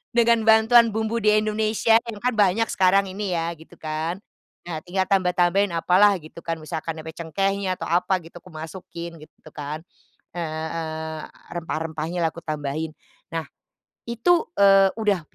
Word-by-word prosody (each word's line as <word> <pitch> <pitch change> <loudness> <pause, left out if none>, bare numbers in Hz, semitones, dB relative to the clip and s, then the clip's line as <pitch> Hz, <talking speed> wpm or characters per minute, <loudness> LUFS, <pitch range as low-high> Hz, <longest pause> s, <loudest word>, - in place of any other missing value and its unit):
Dengan 235 -1 +4
bantuan 225 +1 +6
bumbu 220 +2 -1
di 215 -1 +3
Indonesia 215 +1 +3
itu 235 -3 -7
kan 250 -1 +2
banyak 210 +1 +3
sekarang 195 +1 +4
ini, 195 -2 -2
ya 165 0 -1
gitu 160 0 -16
kan. 155 +2 -3 0.5
Nah, 165 -3 -4
tinggal 190 +1 -1
tambah-tambahin 185 +1 +3
apalah, 190 +4 +5
gitu 155 +2 -11
kan. 165 0 -2
Misalkan 160 +1 -5
ape 160 - -7
cengkehnya 190 +4 -1
atau - - -5
apa, 180 +3 +2
gitu, 170 +1 -12
aku - - -18
masukin, 170 +1 -8
gitu 155 0 -16
kan, 150 +2 -6 0.5
heeh, 160 -1 -4 0.3
rempah-rempahnya 165 0 -3
lah - - +2
aku 170 - -9
tambahin. 155 +1 -3 0.4
Nah, 165 -1 -3 0.6
itu, 320 +9 +3
eee, 195 -1 +6
udah 205 -5 +1
180 Hz, 150 wpm, -24 LUFS, 160-210 Hz, 0.6 s, bantuan